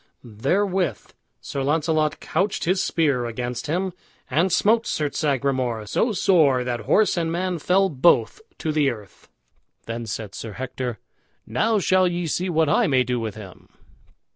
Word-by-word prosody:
Therewith 180 - -1 0.3
Sir 135 - -4
Launcelot 155 +1 +1
couched 190 +5 -1
his 185 +3 +1
spear 140 -7 +1
against 120 +2 -4
him, 180 +4 -1 0.4
and 170 +7 +2
smote 220 +6 +3
Sir 150 -2 -1
Sagramour 130 -6 -1
so 225 - 0
sore 160 -10 +3
that 120 -1 -2
horse 215 -3 +2
and 165 -1 0
man 180 0 -2
fell 190 +5 +3
both 170 - +2 0.2
to 160 - -2
the 150 -2 +2
earth. 105 -6 -10 0.6
Then 115 0 -5
said 105 -1 -5
Sir 110 -2 -7
Hector, 125 -1 -4 0.5
"Now 215 - +1
shall 185 -1 +3
ye 175 0 -2
see 180 +3 -1
what 160 -2 +2
I - - +3
may 130 -3 +3
do 125 0 -2
with 110 -2 -4
him." 100 -4 -12
150 Hz, 155 wpm, -23 LUFS, 125-180 Hz, 0.6 s, smote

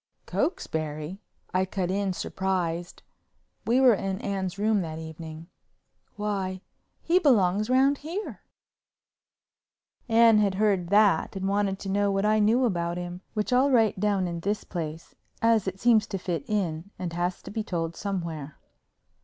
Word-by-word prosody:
"Cokesbury!" 155 - -3 0.3
I 185 +1 +3
cut 185 -1 -2
in 195 0 0
surprised—we 185 +6 -3
were 255 -3 +7
in 195 -1 -2
Anne's 195 -2 -3
room 210 0 +2
that 160 -2 -5
evening—"why, 170 +4 -7 0.4
he 350 +2 +4
belongs 215 - +3
round 270 +2 +3
here." 345 +8 -5 1.7
Anne 225 -1 +6
had 200 -2 +2
heard 195 -4 +1
that 200 -3 +3
and 190 0 -2
wanted 200 -1 +1
to 195 - -6
know 200 +1 +2
what 195 +1 0
I 215 0 +3
knew 225 +5 +3
about 175 -5 -1
him, 175 0 -6
which 215 +4 -1
I'll 260 +3 +4
write 225 -7 +3
down 200 -2 +1
in 170 -1 -4
this 205 +4 -2
place 160 -2 -6 0.3
as 225 -3 +3
it 190 0 -4
seems 230 -2 +4
to 195 - -3
fit 175 -5 -3
in 185 -4 -1
and 175 -2 -4
has 175 +1 -2
to 195 - -8
be 220 +1 -2
told 165 -4 -3
somewhere. 170 -7 -4
195 Hz, 145 wpm, -27 LUFS, 175-215 Hz, 1.7 s, were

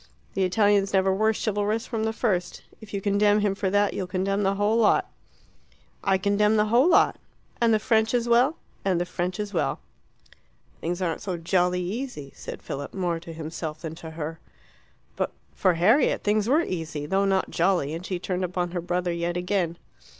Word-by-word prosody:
The 195 - 0
Italians 200 +1 +2
never 190 0 +3
were 215 +3 +3
chivalrous 215 +1 -1
from 225 -2 -2
the 220 - 0
first. 195 -6 -1 0.2
If 220 - -12
you 200 - -3
condemn 205 +1 +3
him 205 -2 +1
for 195 -1 -1
that, 205 +1 +2
you'll 185 - -3
condemn 195 +2 -1
the 195 0 +1
whole 205 +2 +2
lot." 230 -2 +3 1.0
"I 195 -1 +3
condemn 210 +2 +2
the 210 - +4
whole 260 +8 +5
lot." 355 - +4 0.4
"And 230 -1 +4
the 220 - +5
French 220 +1 +2
as 240 -1 0
well?" 245 +6 +4 0.3
"And 185 -3 +1
the 175 - 0
French 180 +2 -3
as 205 -1 -4
well." 175 - 0 1.0
"Things 175 +3 -2
aren't 165 -2 -2
so 185 -3 -3
jolly 180 +1 +1
easy," 190 - -5
said - - -8
Philip, 140 +1 -6
more 175 -3 -1
to 165 - -10
himself 160 -1 -6
than 160 -1 -5
to 160 - -7
her. 160 0 -6 0.8
But - - -2 0.2
for 185 -3 +2
Harriet 215 - +3
things 210 +1 +1
were 305 +6 +4
easy, 160 - -4
though 195 +6 +1
not 195 -1 +1
jolly, 175 -4 +1
and 165 +2 -5
she 185 0 -3
turned 180 +1 -3
upon 180 -1 -2
her 175 -1 -2
brother 175 0 -1
yet 170 +1 -2
again. 180 -2 -1
190 Hz, 190 wpm, -25 LUFS, 175-210 Hz, 1.0 s, whole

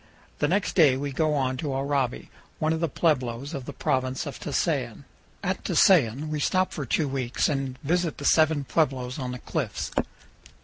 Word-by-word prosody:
The 145 - +2
next 185 +4 0
day 145 -7 +5
we 140 +1 -3
go 155 +2 +1
on 130 -2 0
to 140 +1 -3
Oraibi, 135 -2 -1 0.3
one 155 +1 +1
of 160 - -2
the 165 -1 0
pueblos 135 -2 0
of 135 -4 -5
the - - -6
Province 130 0 -1
of - - -7
Tusayan. - - -1 0.4
At - - -2
Tusayan 150 - +4
we 155 -1 -2
stop 185 +5 +1
for 145 -5 -4
two 150 +5 +1
weeks 130 -3 0
and 135 -3 -2
visit 170 +2 0
the 145 - -6
seven 155 -2 +4
pueblos 130 -3 0
on 130 -2 -3
the 125 - -5
cliffs. - - -3
140 Hz, 180 wpm, -26 LUFS, 130-155 Hz, 0.4 s, day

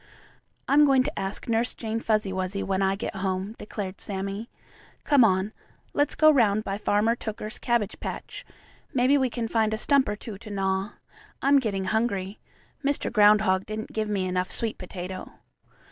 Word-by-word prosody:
"I'm 290 +2 +6
going 270 -2 +4
to - - -4
ask 195 +1 -3
Nurse 230 +1 0
Jane 225 0 -3
Fuzzy 215 -4 0
Wuzzy 185 +1 -2
when 190 0 -1
I 195 0 +2
get 195 -1 -5
home," 190 +2 -2
declared 200 -3 -6
Sammie. 200 +3 -3 0.5
"Come 285 -4 +5
on, 195 0 +2 0.4
let's 290 0 +1
go 310 0 +6
'round 215 -7 +3
by 195 -1 -3
Farmer 210 +2 +2
Tooker's 215 -1 -6
cabbage 235 -4 0
patch. - - -6 0.5
Maybe 255 +3 +4
we 265 -3 +2
can 230 -1 -3
find 220 -1 +1
a - - -5
stump 275 +1 +3
or 210 - -1
two 210 -2 -9
to 220 - -11
gnaw. 195 0 -1 0.5
I'm 280 +1 +5
getting 200 -6 -2
hungry. 205 -2 -1 0.4
Mr. 280 -3 -1
Groundhog 210 -3 +4
didn't 215 +1 -5
give 215 -1 -1
me 195 -3 0
enough 185 0 -1
sweet 225 -2 -2
potato." 185 0 -7
210 Hz, 170 wpm, -26 LUFS, 195-235 Hz, 0.5 s, I'm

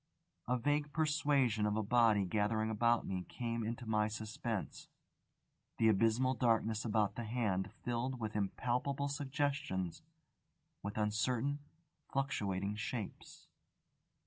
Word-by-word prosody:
A 125 +1 +2
vague 145 +4 0
persuasion 145 -8 +2
of 105 +1 0
a 110 - +1
body 110 -2 +4
gathering 110 +3 +1
about 115 +2 +3
me 90 -1 -2
came 115 -2 -2
into 115 +3 -4
my 105 -1 +2
suspense. 110 0 -4 0.9
The 110 - +5
abysmal 115 +5 +3
darkness 115 -2 +2
about 110 -2 +1
the 120 - -4
Hand 105 -5 -1
filled 125 +2 -1
with 110 -2 -3
impalpable 125 +7 0
suggestions, 140 - -1 0.8
with 100 +1 -5
uncertain, 115 +6 +1 0.5
fluctuating 105 -7 -1
shapes. 110 -1 -5
115 Hz, 115 wpm, -36 LUFS, 105-130 Hz, 0.9 s, The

